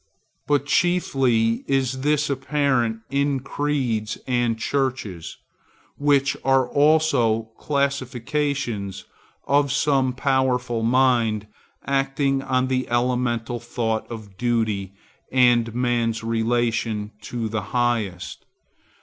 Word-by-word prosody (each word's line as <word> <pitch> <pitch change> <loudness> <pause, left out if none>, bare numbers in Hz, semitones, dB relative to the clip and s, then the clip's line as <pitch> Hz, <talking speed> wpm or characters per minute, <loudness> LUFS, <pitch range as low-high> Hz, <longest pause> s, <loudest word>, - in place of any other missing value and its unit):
But 145 -1 +2
chiefly 135 -9 +2
is 135 -1 0
this 150 +1 +1
apparent 130 -4 0
in 140 0 +1
creeds 130 -6 -2
and 120 -3 0
churches, 115 - -3 0.6
which 140 -1 +2
are 135 -1 +3
also 140 -7 +2
classifications 140 -5 -2 0.4
of 140 -1 +2
some 140 -3 +2
powerful 130 -3 0
mind 115 -3 +2 0.4
acting 135 0 0
on 130 -1 0
the 130 0 -1
elemental 120 0 0
thought 110 -2 -3
of 105 -4 -9
duty, 110 -5 0 0.4
and 120 -3 +4
man's 120 -2 0
relation 115 -2 0
to 115 +1 -4
the 110 0 -2
Highest. 115 -7 -2
125 Hz, 95 wpm, -23 LUFS, 115-140 Hz, 0.6 s, and